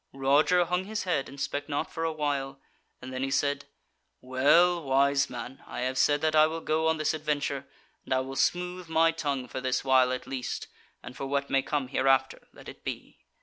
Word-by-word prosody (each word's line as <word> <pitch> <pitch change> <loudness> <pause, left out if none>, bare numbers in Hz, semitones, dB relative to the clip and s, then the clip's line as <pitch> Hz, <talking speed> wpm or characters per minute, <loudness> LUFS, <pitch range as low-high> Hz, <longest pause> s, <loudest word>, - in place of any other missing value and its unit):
Roger 145 +6 +3
hung 180 +2 -1
his 220 +2 -3
head 165 -7 -1
and 140 - -11
spake 145 +2 -3
not 145 - -2
for 165 - -3
a 165 - 0
while, 140 -3 -2 0.4
and 130 +1 -7
then 130 - -3
he 135 - -1
said: 140 +1 0 0.5
"Well, 155 +8 +3
wise 140 0 +2
man, 125 +2 -8
I - - -5
have 130 +1 -1
said 145 +2 +3
that 155 0 +1
I 155 0 +7
will 160 +1 -4
go 160 0 0
on 160 0 +2
this 155 0 0
adventure, 145 -3 -2 0.4
and - - -13
I 130 0 +3
will 135 +1 -6
smooth 180 +2 -1
my 165 0 +4
tongue 140 -6 -3
for 130 - -5
this 130 -1 0
while 130 -1 +4
at 130 0 -3
least, 130 -2 -4 0.4
and 125 - -9
for 135 - -5
what 140 0 -1
may 135 - +3
come 140 -2 -2
hereafter, 135 -1 +1
let - - -15
it - - -11
be. - - -7
140 Hz, 210 wpm, -28 LUFS, 135-160 Hz, 0.5 s, I